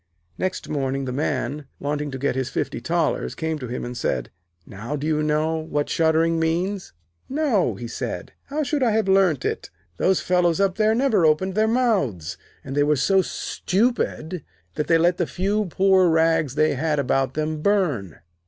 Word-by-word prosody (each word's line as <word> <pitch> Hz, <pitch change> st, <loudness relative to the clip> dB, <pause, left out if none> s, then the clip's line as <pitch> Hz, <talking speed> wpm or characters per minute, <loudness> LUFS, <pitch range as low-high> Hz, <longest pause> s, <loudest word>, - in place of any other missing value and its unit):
Next 185 Hz, 0 st, -3 dB
morning, 135 Hz, -2 st, -2 dB
the 130 Hz, -, -3 dB
Man, 140 Hz, 0 st, -2 dB
wanting 145 Hz, +1 st, -2 dB
to 135 Hz, -, -5 dB
get 140 Hz, +2 st, 0 dB
his 130 Hz, -1 st, -1 dB
fifty -, -, -3 dB
thalers, 165 Hz, +5 st, -1 dB
came 160 Hz, -1 st, -2 dB
to 125 Hz, -, -6 dB
him 120 Hz, +1 st, -4 dB
and 120 Hz, 0 st, -6 dB
said: 60 Hz, -, -2 dB, 0.3 s
'Now 115 Hz, +9 st, -6 dB
do 145 Hz, 0 st, -4 dB
you 155 Hz, -1 st, +1 dB
know 155 Hz, +1 st, +1 dB
what 150 Hz, -2 st, -2 dB
shuddering 165 Hz, 0 st, +2 dB
means?' 175 Hz, +4 st, -1 dB, 0.4 s
'No,' 260 Hz, -, +1 dB
he 120 Hz, +5 st, -6 dB
said; 115 Hz, -, -5 dB
'how 300 Hz, +2 st, -2 dB
should 285 Hz, +1 st, -1 dB
I 235 Hz, -4 st, +3 dB
have 220 Hz, -2 st, +1 dB
learnt 190 Hz, -7 st, +3 dB
it? -, -, -2 dB, 0.3 s
Those 190 Hz, -, +2 dB
fellows 180 Hz, -1 st, +2 dB
up 195 Hz, -1 st, +1 dB
there 220 Hz, 0 st, +3 dB
never 230 Hz, -7 st, +2 dB
opened 160 Hz, +5 st, +2 dB
their 215 Hz, +2 st, +2 dB
mouths, 200 Hz, -, 0 dB, 0.3 s
and 135 Hz, -, -6 dB
they 145 Hz, -, +3 dB
were 150 Hz, +1 st, +3 dB
so 190 Hz, +8 st, +3 dB
stupid 185 Hz, -, -1 dB, 0.3 s
that 150 Hz, -, -2 dB
they 165 Hz, -, +5 dB
let 175 Hz, +2 st, +3 dB
the 175 Hz, -, 0 dB
few 205 Hz, +3 st, 0 dB
poor 190 Hz, 0 st, +4 dB
rags 160 Hz, -4 st, +2 dB
they 155 Hz, +1 st, +3 dB
had 150 Hz, +2 st, 0 dB
about 135 Hz, -1 st, 0 dB
them 155 Hz, 0 st, -2 dB
burn.' 150 Hz, -, 0 dB
160 Hz, 180 wpm, -23 LUFS, 140-190 Hz, 0.4 s, they